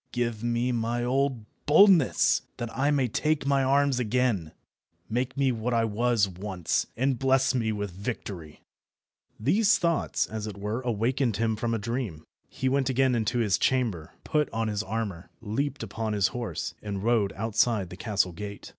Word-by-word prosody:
Give 120 -3 -2
me 120 +1 0
my 120 0 -1
old 130 -2 0 0.2
boldness, 175 -1 +5 0.2
that 120 -1 -5
I 140 +2 +2
may 140 -4 +2
take 150 +5 0
my 140 -1 +2
arms 140 -1 +2
again; 115 -8 0 0.6
make 125 +4 -2
me 135 -2 +3
what 120 +1 -1
I 115 -1 +3
was 115 -1 +2
once, 95 -2 -2
and 130 0 +1
bless 135 0 +3
me 115 -3 0
with 105 -2 -3
victory." 95 -5 -6 0.8
These 210 - +3
thoughts, 170 -2 0
as 110 -1 -5
it 100 -2 -7
were, 105 +5 -3
awakened 120 0 0
him 110 0 +1
from 115 +1 -1
a - - 0
dream. 110 -7 -4 0.3
He 130 - -3
went 135 0 +1
again 130 0 +2
into 115 0 0
his 110 -5 +2
chamber, 115 -12 0
put 150 -1 0
on 115 -1 -1
his 105 -1 -1
armour, 100 -4 -4
leaped 125 +5 -3
upon 110 +1 -3
his 100 -2 +2
horse, 120 -2 -4
and 100 -2 -4
rode 110 -4 +2
outside 110 -2 0
the - - -7
castle 100 -2 0
gate. 100 +3 -8
115 Hz, 170 wpm, -27 LUFS, 105-130 Hz, 0.8 s, boldness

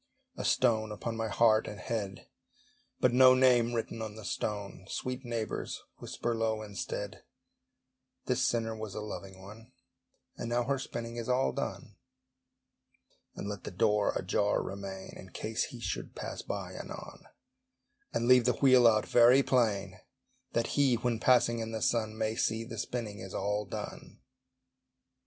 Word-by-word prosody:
A - - -5
stone 110 -4 +2
upon 115 +2 -4
my 115 0 -2
heart 110 0 +4
and 105 - -7
head, 100 -1 -4 0.7
But 125 - +3
no 130 0 +8
name 125 -2 +4
written 115 0 -3
on 110 -1 -5
the 110 -2 -9
stone! 100 -3 -4
Sweet 130 +1 -3
neighbours, 115 -3 -3 0.2
whisper 120 - -3
low 110 -1 -1
instead, 105 -3 -5 1.0
"This - - +1
sinner 115 -1 0
was 110 -2 -6
a - - -3
loving 95 -2 -7
one, 110 +6 -13 0.6
And 115 - -4
now 120 +1 +1
her 135 +2 0
spinning 120 -2 -5
is 115 +1 -4
all 125 +1 +2
done." - - -5 1.4
And - - -5
let 100 -3 -5
the - - -5
door 105 +2 +2
ajar 100 +2 +1
remain, 95 -1 -7
In - - -11
case - - -2
he - - -9
should - - -4
pass - - -5
by - - -5
anon; - - -9 0.9
And 115 +1 0
leave 125 -2 +6
the 125 - +4
wheel 130 -3 +6
out 110 -2 +4
very 120 +3 +6
plain, 100 -8 +1 0.5
That 115 0 +1
HE, 140 -4 +4
when 120 -1 -1
passing 120 -2 +4
in 115 0 -4
the 110 - -2
sun, 110 -2 +1
May 110 0 0
see 110 0 0
the 115 - -7
spinning 110 -5 -4
is 95 0 -7
all 105 +1 -1
done. - - -7
115 Hz, 155 wpm, -31 LUFS, 105-120 Hz, 1.4 s, no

